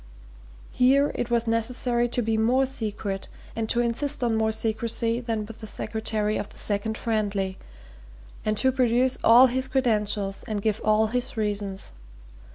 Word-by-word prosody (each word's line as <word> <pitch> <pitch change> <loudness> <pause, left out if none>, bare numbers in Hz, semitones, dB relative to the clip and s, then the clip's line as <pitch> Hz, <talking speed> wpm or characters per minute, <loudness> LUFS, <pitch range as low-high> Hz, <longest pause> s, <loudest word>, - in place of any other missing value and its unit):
Here 275 +3 +3
it 240 - -3
was 235 -1 +1
necessary 240 +1 +1
to 245 0 -1
be 220 0 0
more 245 +5 +3
secret, 210 -6 -4 0.3
and 225 -1 -2
to 240 - +2
insist 260 +4 -2
on 235 -2 +1
more 220 0 +1
secrecy 225 +1 0
than 225 -3 -3
with 225 +1 -11
the 220 - -7
secretary 215 0 -2
of - - -4
the - - -15
Second 215 +2 -2
Friendly, 205 -4 -1 0.8
and 215 -1 0
to 260 +5 +4
produce 250 0 +2
all 240 +3 +8
his 260 +1 0
credentials 210 -6 0
and 215 -2 -2
give 215 +1 -1
all 215 0 +3
his 250 -1 -2
reasons. 205 - -2
225 Hz, 160 wpm, -25 LUFS, 215-245 Hz, 0.8 s, all